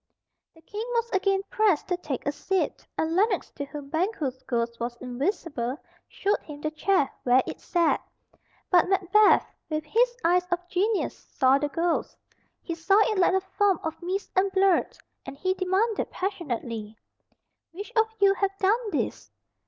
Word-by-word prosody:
The 325 - -20
King 420 +6 -5
was 470 0 0
again 390 0 +1
pressed 415 -8 +2
to 360 - +2
take 290 -7 -5
a 285 - +1
seat, 380 +5 -2
and 320 +1 0
Lennox, 395 0 +1
to 285 - -5
whom 280 0 -9
Banquo's 315 - -1
ghost 235 -1 -1
was 235 0 -3
invisible, 260 - -2 0.3
showed 405 +1 0
him 295 -2 -10
the 305 +1 -2
chair 310 -1 +2
where 250 +1 +4
it - - -6
sat. 340 -2 +1 0.7
But 360 0 +5
Macbeth, 390 +2 +4 0.2
with 310 -1 -2
his 480 +8 +2
eyes 360 +1 +3
of 350 0 -2
genius, 395 +4 0
saw 265 0 +3
the 295 0 -1
ghost. 335 +2 -1 0.5
He 335 - -3
saw 335 +5 +2 0.2
it 400 - -1
like 365 0 +4
a 380 - +2
form 385 -1 +1
of 320 +2 -4
mist 375 +3 -3
and 385 +1 +3
blood, 385 -2 +2 0.3
and 275 0 -9
he 370 +5 0
demanded 390 +4 0
passionately, 235 - -4 0.7
"Which 400 +5 -8
of 445 -1 +4
you 395 -1 +5
have 390 0 -1
done 430 +4 +1
this?" - - -3
360 Hz, 165 wpm, -26 LUFS, 290-395 Hz, 0.7 s, But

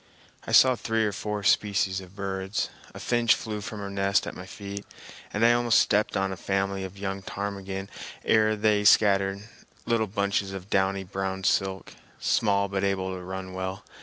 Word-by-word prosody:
I - - -4
saw 130 -1 +7
three 110 -1 0
or 105 - 0
four 105 0 -4
species 100 -2 +2
of 95 +1 -14
birds. 95 0 -3 0.2
A - - -10
finch 120 -1 +3
flew 105 -2 -5
from 105 +1 -6
her 100 - -5
nest 100 0 +1
at - - -5
my 90 - -9
feet; 100 0 -7 0.5
and 105 +3 +2
I 120 - +6
almost 120 -1 +3
stepped 105 +1 +2
on 95 0 0
a - - -3
family 95 +1 -1
of 95 +1 -8
young 95 0 -4
ptarmigan 100 -1 -5 0.4
ere 110 0 +4
they 105 -1 +2
scattered, 100 0 +4 0.4
little 115 -2 +1
bunches 100 0 -1
of 95 +1 -8
downy 95 0 +1
brown 95 0 -4
silk, 95 -1 0 0.3
small 100 -6 +2
but 100 0 -2
able 95 -1 0
to 90 - -7
run 95 +1 -6
well. 95 +1 -5
100 Hz, 180 wpm, -27 LUFS, 95-105 Hz, 0.5 s, saw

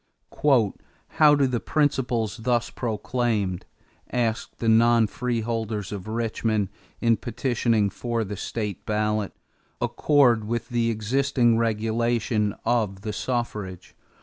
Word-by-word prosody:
"How 150 -2 +6
do 140 -1 +3
the 125 -2 0
principles 125 -8 0
thus 120 0 0
proclaimed," 110 -5 -2 0.4
asked 115 -2 -1
the 115 - -3
non 115 +1 +5
freeholders 115 -2 -2
of 100 -1 -6
Richmond, 110 -2 -1 0.3
in 115 -2 +3
petitioning 115 -3 0
for 115 +1 -2
the 105 0 -4
ballot, 105 -1 0 0.5
"accord 125 -7 +3
with 115 +1 -3
the 120 -1 +1
existing 120 +1 +2
regulation 115 -1 0
of 105 -5 0
the 105 0 -4
suffrage? 105 -6 -4
115 Hz, 105 wpm, -25 LUFS, 105-120 Hz, 0.5 s, How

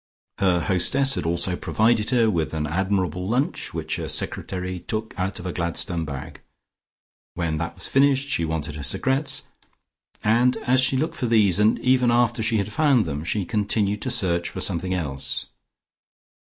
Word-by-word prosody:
Her 90 -3 +3
hostess 135 - +3
had - - -2
also 85 +2 0
provided 110 +3 +1
her 120 -3 +3
with 80 -8 -1
an 75 -1 -1
admirable 90 +1 -1
lunch, 125 +7 -1
which - - -3
her - - -4
secretary 90 -1 -3
took 110 +5 -4
out 95 +1 -2
of 90 - -9
a 90 - -3
Gladstone 85 -1 -2
bag. 75 +1 -7 0.9
When 80 -3 -1
that 85 +2 -4
was - - -5
finished, 140 0 +3
she 135 - 0
wanted 80 -2 -3
her - - -6
cigarettes, 135 - 0 0.8
and 120 +4 +3
as 130 +1 +4
she 130 +1 +2
looked 155 +5 -2
for 125 - -1
these, 105 -5 +3
and 105 +1 +4
even 125 -1 +3
after 120 -1 +2
she 110 0 +1
had 105 0 -2
found 140 -6 +3
them, 75 -1 -4
she 95 +3 -1
continued 105 -1 0
to 130 - -2
search 90 -8 0
for - - -7
something 95 0 -1
else. 70 -6 -3
100 Hz, 170 wpm, -24 LUFS, 85-120 Hz, 0.9 s, as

